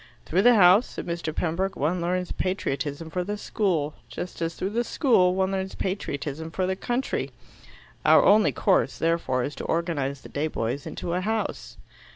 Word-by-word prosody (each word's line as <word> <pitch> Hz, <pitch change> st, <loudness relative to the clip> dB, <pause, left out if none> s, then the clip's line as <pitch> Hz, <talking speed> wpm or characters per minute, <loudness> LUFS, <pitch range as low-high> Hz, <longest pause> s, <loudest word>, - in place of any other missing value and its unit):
"Through 180 Hz, +4 st, +2 dB
the 245 Hz, +3 st, +6 dB
House," 195 Hz, +3 st, +6 dB
said -, -, -7 dB
Mr. 170 Hz, -2 st, -3 dB
Pembroke, 175 Hz, +4 st, -1 dB
"one 170 Hz, +5 st, 0 dB
learns 180 Hz, +1 st, -1 dB
patriotism 155 Hz, -4 st, -3 dB
for 180 Hz, +1 st, -1 dB
the 205 Hz, +3 st, -4 dB
school, 175 Hz, -9 st, -1 dB, 0.2 s
just 170 Hz, +9 st, -6 dB
as 165 Hz, 0 st, -2 dB
through 190 Hz, -, -3 dB
the 235 Hz, +3 st, 0 dB
school 210 Hz, -, +3 dB
one 190 Hz, 0 st, +1 dB
learns 190 Hz, 0 st, -3 dB
patriotism 160 Hz, -5 st, -3 dB
for 185 Hz, +3 st, -1 dB
the 190 Hz, +1 st, -1 dB
country. 245 Hz, +6 st, -2 dB, 0.7 s
Our -, -, +6 dB
only 210 Hz, +1 st, +5 dB
course, 195 Hz, -, +1 dB
therefore, 165 Hz, -7 st, 0 dB
is 145 Hz, -, -3 dB
to -, -, -5 dB
organize 145 Hz, -5 st, -1 dB
the -, -, -12 dB
day 150 Hz, +2 st, -1 dB
boys 130 Hz, -1 st, -3 dB
into 170 Hz, -, -4 dB
a 180 Hz, -, 0 dB
House." 220 Hz, +3 st, -3 dB
180 Hz, 180 wpm, -26 LUFS, 155-190 Hz, 0.7 s, the